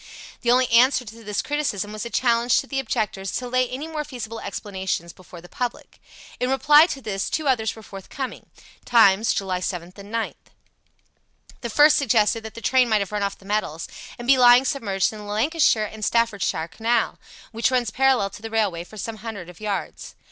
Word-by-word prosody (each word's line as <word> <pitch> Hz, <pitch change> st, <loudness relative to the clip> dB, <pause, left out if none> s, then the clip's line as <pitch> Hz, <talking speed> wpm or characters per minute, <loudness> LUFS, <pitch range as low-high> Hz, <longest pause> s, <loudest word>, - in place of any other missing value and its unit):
The 240 Hz, -, -1 dB
only 250 Hz, +1 st, +4 dB
answer 250 Hz, +2 st, +4 dB
to 225 Hz, +1 st, -11 dB
this 210 Hz, -2 st, -2 dB
criticism 215 Hz, -9 st, -2 dB
was 215 Hz, +2 st, -5 dB
a -, -, -8 dB
challenge 235 Hz, 0 st, +2 dB
to -, -, -5 dB
the 270 Hz, 0 st, -3 dB
objectors 205 Hz, -6 st, -2 dB
to 250 Hz, -, -3 dB
lay 255 Hz, 0 st, +1 dB
any 275 Hz, +5 st, -5 dB
more 310 Hz, -2 st, -4 dB
feasible 230 Hz, -6 st, -7 dB
explanations 190 Hz, -6 st, -4 dB
before 180 Hz, -2 st, -13 dB
the 175 Hz, -, -13 dB
public. 245 Hz, +5 st, -5 dB, 0.4 s
In 250 Hz, -, 0 dB
reply 295 Hz, +4 st, +6 dB
to 275 Hz, -, -5 dB
this 195 Hz, -3 st, -3 dB
two 310 Hz, -2 st, -2 dB
others 225 Hz, -5 st, +1 dB
were 220 Hz, -, -12 dB
forthcoming 205 Hz, +7 st, -7 dB, 0.4 s
(Times, 220 Hz, -2 st, +4 dB
July 185 Hz, -2 st, -1 dB
7th 180 Hz, -1 st, -5 dB
and 200 Hz, +1 st, -11 dB
9th). 230 Hz, -1 st, -2 dB, 1.3 s
The 235 Hz, -, -4 dB
first 295 Hz, +6 st, +5 dB
suggested 225 Hz, -4 st, +2 dB
that 220 Hz, 0 st, -9 dB
the 230 Hz, -, -8 dB
train 255 Hz, +1 st, +3 dB
might 215 Hz, -2 st, +3 dB
have 200 Hz, -, -4 dB
run 210 Hz, -1 st, -2 dB
off 200 Hz, 0 st, -2 dB
the 195 Hz, -, -19 dB
metals 195 Hz, -6 st, -2 dB, 0.3 s
and 240 Hz, -, -8 dB
be 265 Hz, -1 st, +5 dB
lying 245 Hz, +1 st, +7 dB
submerged 205 Hz, -8 st, 0 dB
in 215 Hz, -, -9 dB
the 210 Hz, -, -9 dB
Lancashire 220 Hz, +2 st, +2 dB
and 215 Hz, +1 st, -9 dB
Staffordshire 210 Hz, -8 st, 0 dB
Canal, 225 Hz, +5 st, -1 dB, 0.3 s
which 230 Hz, +1 st, +1 dB
runs 245 Hz, -4 st, 0 dB
parallel 260 Hz, -7 st, +2 dB
to -, -, -11 dB
the 225 Hz, -, -6 dB
railway 205 Hz, -7 st, 0 dB
for 215 Hz, +5 st, -14 dB
some 220 Hz, +2 st, -5 dB
hundred 205 Hz, -5 st, -7 dB
of 180 Hz, -, -19 dB
yards. 205 Hz, -2 st, -4 dB
225 Hz, 200 wpm, -23 LUFS, 200-250 Hz, 1.3 s, lying